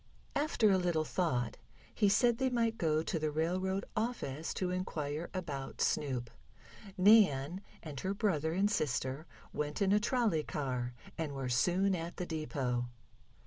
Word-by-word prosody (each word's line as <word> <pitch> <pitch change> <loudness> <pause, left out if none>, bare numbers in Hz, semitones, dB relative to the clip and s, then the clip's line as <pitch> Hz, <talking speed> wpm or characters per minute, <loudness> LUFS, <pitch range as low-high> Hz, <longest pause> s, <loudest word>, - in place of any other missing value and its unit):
After 280 -8 +3
a 190 - +4
little 170 -3 +1
thought 125 -10 -1 0.4
he 205 -2 +3
said 235 +3 +3
they 265 -1 +2
might 230 -2 0
go 155 -2 +2
to 165 - -1
the 155 0 0
railroad 185 +5 -1
office 215 - -2
to 185 -1 -1
inquire 160 -4 -3
about 150 -8 -5
Snoop. 125 -5 0 0.7
Nan 185 -5 +5 0.2
and 145 -4 -6
her 190 +1 -2
brother 160 -8 +1
and 200 +4 +2
sister 140 - -1 0.3
went 150 0 -2
in 195 -1 +3
a 210 - +5
trolley 230 - +1
car, 125 -5 -3 0.2
and 155 -3 -2
were 135 -2 -3
soon 180 +10 +2
at 170 -1 -4
the 180 - -2
depot. 135 -7 -2
165 Hz, 150 wpm, -33 LUFS, 145-195 Hz, 0.7 s, Nan